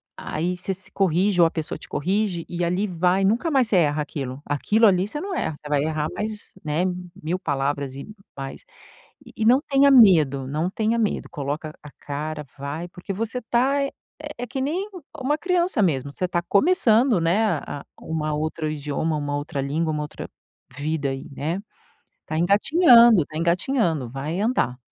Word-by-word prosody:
aí 175 +4 -3
você 180 +2 -4
se 185 - -15
corrige, 190 0 +2
ou 170 - +7
a - - -5
pessoa 160 -2 -4
te - - -12
corrige 185 +2 -1
e 175 0 -3
ali 180 +4 0
vai, 180 +1 +1
nunca 230 - +2
mais 265 -6 +3
você 205 - +2
erra 150 -3 +2
aquilo. 135 -3 -5
Aquilo 210 - +2
ali 190 -1 +4
você 295 - -5
não 390 +4 -4
erra. 160 - -2
Você 150 - -12
vai 145 -1 +1
errar 155 -1 -1
mais, 215 0 -4
né, 155 +2 0 0.4
1000 170 +4 -2
palavras 140 -2 -2
e 140 - -8 0.3
mais 135 0 -6 0.6
e - - -14
e 225 - -1
não 250 +5 +5
tenha 275 0 +5
medo, 155 - +6
não 155 +5 -1
tenha 220 +4 0
medo, 220 -3 -1
coloca 150 +2 -4
a 150 - -11
cara 150 +1 -4
vai, 145 +5 -5
porque 180 +2 -7
você 225 +5 -3
tá, 255 +5 +1
eh, 275 - -3 0.5
é 245 - -3
que 260 +3 -4
nem 345 +9 -1 0.3
uma 295 +2 0
criança 360 - +1
mesmo, 140 -7 0
você 180 - -1
tá 175 -1 -1
começando, 235 - +4
né, 175 +7 +2
a 155 -6 -3
a - - -13 0.2
uma 155 -1 -2
outro 155 +1 -2
idioma, 150 +1 -2
uma 145 -1 -2
outra 145 0 -3
língua, 155 +4 -1
uma 150 -1 -2
outra 150 - -7 0.5
vida 145 -1 -1
aí, 135 0 -6
né? 160 +7 -3 0.7
Tá 155 - -2
engatinhando, 230 - +6
tá 155 - -10
engatinhando. 170 - 0
Vai 145 +8 -4
andar. 210 - 0
170 Hz, 185 wpm, -23 LUFS, 150-220 Hz, 0.7 s, ou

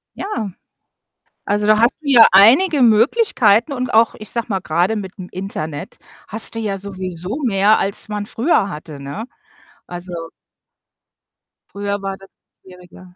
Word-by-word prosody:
Ja, 230 - -4 1.0
also, 205 +1 0
da 215 0 +4
hast 235 +3 +3
du 300 - -10
ja 240 -4 +8
einige 265 - +5
Möglichkeiten 235 - +3
und 255 -3 -3
auch, 225 +1 +4
ich 215 - -7
sage 235 -1 -2
mal, 190 -2 -1
grade 175 +8 0
mit'm 190 -2 -7
Internet 160 -6 -6 0.3
hast 220 +2 -2
du 225 - -3
ja 205 -3 -3
sowieso 185 - -6
mehr, 205 -1 +3
als 195 +2 -1
man 210 -1 -4
früher 225 - 0
hatte, 150 -3 -9
ne? 140 +11 -7 0.6
Also 180 +1 -8 1.6
früher 200 0 -4
war 195 0 -4
das 195 0 -18 0.3
schwieriger. 180 0 -16
205 Hz, 140 wpm, -18 LUFS, 185-225 Hz, 1.6 s, ja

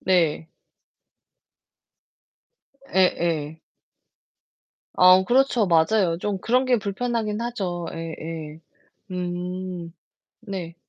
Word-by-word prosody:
네. 165 -3 +1 2.5
예예. 165 -4 +1 1.3
아 185 +1 +7
그렇죠. 250 -2 +3
맞아요. 170 +1 +3
좀 200 0 -2
그런 250 +6 +2
게 255 -2 +3
불편하긴 215 +1 -2
하죠. 190 -8 -3
예예. 160 -1 -7 0.5
음. 180 -1 -4 0.5
네. 190 -6 -6
180 Hz, 130 characters per minute, -24 LUFS, 165-210 Hz, 2.5 s, 아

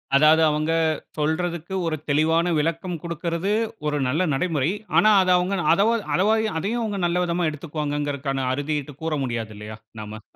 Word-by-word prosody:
அதாவது 155 +3 +6
அவங்க 155 +1 0 0.5
சொல்றதுக்கு 170 +3 -2
ஒரு 160 -1 0
தெளிவான 165 +4 +2
விளக்கம் 165 +3 -2
குடுக்கறது 170 +3 -2 0.4
ஒரு 150 - 0
நல்ல 160 +8 +1
நடைமுறை. 155 0 0 0.3
ஆனா, 215 - +6
அத 185 - 0
அவங்க 180 +2 0 0.2
அதவா 210 +6 +3 0.2
அத 185 - +2 0.4
அதையும் 215 +1 -2
நல்ல 175 +1 +1
விதமா 170 -1 0
எடுத்துக்குவாங்ககறதுக்கான 145 -3 -3
அறுதியிட்டு 145 0 -3
கூற 160 - -1
முடியாது 115 -3 -4
இல்லையா 105 +1 -8 0.2
நாம. 105 +1 -8
160 Hz, 140 wpm, -23 LUFS, 145-175 Hz, 0.5 s, அதாவது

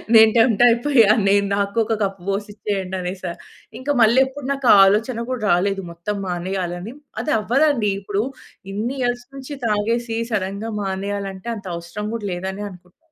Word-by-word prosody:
నేను 220 0 +8
టెంప్ట్ 225 -1 +4
అయిపోయా, 235 -2 +4 0.2
నేను 200 0 +4
నాకు 200 +2 -1
ఒక 220 0 -1
కప్ 195 -1 -2
పోసి 200 +2 -2
ఇచ్చేయండి 195 -3 -3
అనేసా. 180 -1 -4 0.5
ఇంకా 285 +3 -1
మళ్ళీ 230 +4 +6
ఎప్పుడు 265 0 -8
నాకు 275 -2 -3
ఆ - - +8
ఆలోచన 225 +4 +1
కూడా 250 -4 -3
రాలేదు 195 +2 +1
మొత్తం 170 +5 -4
మానేయాలని. 180 +3 -3 0.3
అది 300 - -1
అవ్వదండి. 240 -1 +2
ఇప్పుడు 200 +1 -2 0.5
ఇన్ని 230 +7 -2
ఇయర్స్ 245 0 -1
నుంచి 275 +2 -7
తాగేసి 225 +2 0
సడెన్‌గా 200 +2 -2
మానేయాలంటే 195 +1 -4
అంత 205 -3 -9
అవసరం 170 +5 -6
కూడా 210 -3 -4
లేదనే 190 +3 -4
అనుకుంటాను. 180 0 -17
205 Hz, 155 wpm, -21 LUFS, 195-235 Hz, 0.5 s, నేను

